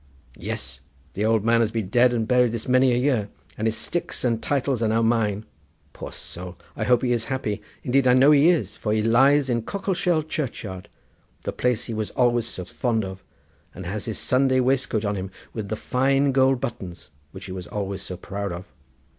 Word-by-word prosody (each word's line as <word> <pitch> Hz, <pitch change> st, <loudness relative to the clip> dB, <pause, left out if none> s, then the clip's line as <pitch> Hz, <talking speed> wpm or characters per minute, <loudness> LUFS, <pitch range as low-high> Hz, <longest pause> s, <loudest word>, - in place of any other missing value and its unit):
"Yes! 65 Hz, 0 st, -4 dB, 0.3 s
the 100 Hz, -, -2 dB
old 110 Hz, -1 st, +2 dB
man 115 Hz, 0 st, +4 dB
has 115 Hz, -2 st, +2 dB
been 110 Hz, -4 st, -3 dB
dead 120 Hz, +3 st, +4 dB
and 115 Hz, -2 st, -1 dB
buried 125 Hz, -2 st, +3 dB
this 115 Hz, -1 st, -4 dB
many 130 Hz, 0 st, +4 dB
a -, -, +2 dB
year, 125 Hz, -6 st, +1 dB, 0.3 s
and 110 Hz, -, -1 dB
his 110 Hz, 0 st, 0 dB
sticks 175 Hz, +9 st, -3 dB
and 115 Hz, -2 st, +1 dB
titles 135 Hz, -3 st, 0 dB
are 115 Hz, -, +2 dB
now 115 Hz, +1 st, +2 dB
mine. 110 Hz, -2 st, +1 dB, 0.5 s
Poor -, -, -8 dB
soul, 90 Hz, 0 st, -8 dB, 0.2 s
I -, -, -2 dB
hope 125 Hz, -1 st, +3 dB
he 125 Hz, -, +1 dB
is 115 Hz, -2 st, +1 dB
happy; 110 Hz, -6 st, -3 dB, 0.2 s
indeed 135 Hz, +1 st, +2 dB
I 125 Hz, -, +6 dB
know 135 Hz, +3 st, +6 dB
he 150 Hz, +3 st, +6 dB
is, 110 Hz, -, +1 dB
for 105 Hz, -, -2 dB
he 110 Hz, -1 st, +1 dB
lies 135 Hz, +5 st, +4 dB
in 120 Hz, -2 st, 0 dB
Cockleshell 180 Hz, -, 0 dB
churchyard, 115 Hz, -11 st, -5 dB, 0.5 s
the -, -, -3 dB
place 125 Hz, -3 st, 0 dB
he 115 Hz, -, -5 dB
was 110 Hz, -1 st, -2 dB
always 120 Hz, -2 st, +2 dB
so 90 Hz, -5 st, -6 dB
fond 115 Hz, -1 st, -1 dB
of, 95 Hz, 0 st, -8 dB, 0.5 s
and 95 Hz, -, -7 dB
has 100 Hz, +4 st, -3 dB
his 110 Hz, -, -3 dB
Sunday 130 Hz, 0 st, +2 dB
waistcoat 125 Hz, -4 st, +1 dB
on 100 Hz, 0 st, 0 dB
him 95 Hz, 0 st, -4 dB, 0.2 s
with 105 Hz, -3 st, -5 dB
the 110 Hz, -, -1 dB
fine 135 Hz, +4 st, +1 dB
gold 130 Hz, -1 st, +3 dB
buttons, 90 Hz, -9 st, -6 dB, 0.2 s
which 95 Hz, +2 st, -9 dB
he 95 Hz, -, -8 dB
was 90 Hz, -1 st, -6 dB
always 100 Hz, -2 st, -4 dB
so 90 Hz, -2 st, -6 dB
proud 100 Hz, +1 st, -5 dB
of. 85 Hz, +2 st, -6 dB
115 Hz, 205 wpm, -24 LUFS, 105-130 Hz, 0.5 s, I